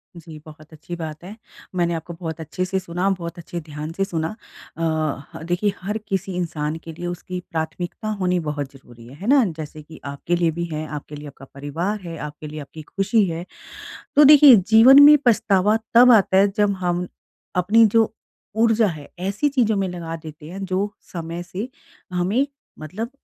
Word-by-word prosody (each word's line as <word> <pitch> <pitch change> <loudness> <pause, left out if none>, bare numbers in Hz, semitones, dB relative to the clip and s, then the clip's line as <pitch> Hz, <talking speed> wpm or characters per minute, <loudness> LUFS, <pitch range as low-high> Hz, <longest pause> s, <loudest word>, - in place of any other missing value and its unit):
जी, 160 -2 -11
बहुत 155 0 -14
अच्छी 155 +3 -8
बात 160 -1 -7
है, 200 +4 -9 0.4
मैंने 170 -1 +1
आपको 165 +1 -5
बहुत 165 -2 -5
अच्छे 160 +3 -3
से 190 +1 -1
सुना, 180 +1 -2
बहुत 175 -3 -4
अच्छे 170 +1 -6
ध्यान 150 0 -7
से 195 - +1
सुना। 165 +1 -3 0.4
अ, - - -6 0.5
ह - - -8
देखिए 190 +3 0
हर 205 +4 -2
किसी 195 0 -2
इंसान 160 -3 -2
के 165 - -8
लिए 175 +3 -7
उसकी 175 +1 -5
प्राथमिकता 170 +5 -4
होनी 180 -1 +1
बहुत 145 -4 -4
ज़रूरी 120 -3 -16
है, 130 - -12
है 190 +8 -8
ना? 275 0 +6
जैसे 155 0 -7
कि 155 +1 -14
आपके 140 +5 -2
लिए 170 -1 +1
भी 170 +2 -3
है। 155 +1 -3
आपके 150 0 -7
लिए 150 0 -9
आपका 135 -1 -12
परिवार 165 +9 -3
है, 170 -2 -7
आपके 150 0 -7
लिए 155 +1 -7
आपकी 155 +3 -10
खुशी 195 +6 +1
है, 165 +1 -5 0.7
तो 295 - +8
देखिए 290 -3 +9
जीवन 225 +8 +7
में 295 +1 +9
पछतावा 210 -2 +3 0.2
तब 245 +1 +8
आता 195 -3 +4
है 200 +1 +6
जब 205 -1 +3
हम 180 0 -1 0.5
अपनी 205 +6 +5
जो 225 -1 +4 0.5
ऊर्जा 225 -1 +4
है 155 -6 -5
ऐसी 200 +10 0
चीज़ों 240 -6 +1
में 195 -1 0
लगा 170 -2 -6
देते 155 -1 -11
हैं 195 +2 -6
जो 190 +2 -1 0.2
समय 170 0 -5
से 190 +6 -6 0.4
हमें 195 +10 +1 0.3
मतलब 195 - -6
175 Hz, 190 wpm, -22 LUFS, 160-200 Hz, 0.7 s, देखिए